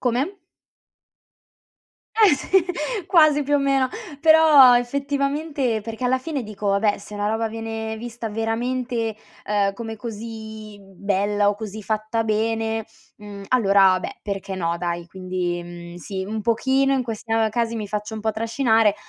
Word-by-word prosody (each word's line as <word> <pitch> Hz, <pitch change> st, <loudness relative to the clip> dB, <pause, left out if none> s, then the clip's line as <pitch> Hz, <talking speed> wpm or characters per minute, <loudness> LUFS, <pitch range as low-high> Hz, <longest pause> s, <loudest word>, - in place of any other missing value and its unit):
Come? 255 Hz, +8 st, 0 dB, 1.8 s
Eh, 425 Hz, -8 st, +6 dB
sì. 370 Hz, +6 st, +2 dB, 0.4 s
Quasi, 310 Hz, -5 st, +5 dB
più 290 Hz, +1 st, 0 dB
o -, -, +4 dB
meno, 275 Hz, -1 st, +2 dB, 0.3 s
però 310 Hz, -5 st, +8 dB
effettivamente 275 Hz, -1 st, -1 dB
perché 225 Hz, +3 st, -6 dB
alla 260 Hz, +1 st, +2 dB
fine 285 Hz, -1 st, -4 dB
dico: 210 Hz, -1 st, -6 dB
“Vabbè, 205 Hz, +1 st, +2 dB
se 210 Hz, -, -11 dB
una 205 Hz, 0 st, -2 dB
roba 220 Hz, +1 st, 0 dB
viene 225 Hz, 0 st, -5 dB
vista 230 Hz, 0 st, -6 dB
veramente, 225 Hz, +1 st, -2 dB, 0.3 s
ehm, 200 Hz, -1 st, +1 dB
come 225 Hz, +1 st, -6 dB
così 220 Hz, -1 st, -8 dB
bella 200 Hz, +1 st, 0 dB
o 205 Hz, -, +2 dB
così 215 Hz, 0 st, -7 dB
fatta 215 Hz, +2 st, -1 dB
bene, 225 Hz, 0 st, -1 dB, 0.3 s
mhmm, 205 Hz, -2 st, -10 dB
allora 195 Hz, -6 st, +4 dB
beh, -, -, -7 dB
perché 195 Hz, -1 st, -4 dB
no, 170 Hz, -2 st, -1 dB
dai?” 170 Hz, 0 st, -3 dB
Quindi, 180 Hz, -1 st, -3 dB
mhmm, 175 Hz, 0 st, -10 dB
sì, 190 Hz, +2 st, -5 dB
un 215 Hz, +1 st, -4 dB
pochino 265 Hz, +4 st, +2 dB
in 265 Hz, -2 st, +1 dB
questa 225 Hz, -1 st, -1 dB
casi 230 Hz, +1 st, -1 dB
mi 210 Hz, -2 st, -4 dB
faccio 210 Hz, +1 st, -4 dB
un 220 Hz, -, -5 dB
po' 220 Hz, +1 st, 0 dB
trascinare, 225 Hz, -1 st, +2 dB
225 Hz, 150 wpm, -23 LUFS, 205-250 Hz, 1.8 s, però